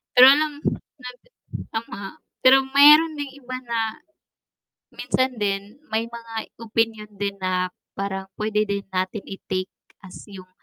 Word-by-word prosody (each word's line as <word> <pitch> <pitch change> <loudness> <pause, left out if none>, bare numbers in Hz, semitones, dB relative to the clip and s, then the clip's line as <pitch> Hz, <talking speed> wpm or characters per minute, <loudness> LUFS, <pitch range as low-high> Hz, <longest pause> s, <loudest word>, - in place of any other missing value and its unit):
Pero 250 - +10
alam 300 +2 +5 0.5
na 250 0 -7 0.7
tama, 225 -2 -5 0.4
pero 265 +1 +6
meron 300 +3 +7
ding 280 -2 -5
iba 255 -2 -7
na, 225 -2 -2 0.9
minsan 260 -2 -1
din 200 +3 -2 0.2
may 225 +1 0
mga 230 -1 -10 0.2
opinyon 225 -1 -1
din 200 0 -3
na 185 -1 -1 0.2
parang 195 -1 -4
pwede 215 0 0
din 200 -1 -3
natin 190 +2 -2
i-take 190 -1 -4 0.3
as 190 -2 -12
yung 190 -3 -12
220 Hz, 130 wpm, -23 LUFS, 195-255 Hz, 0.9 s, Pero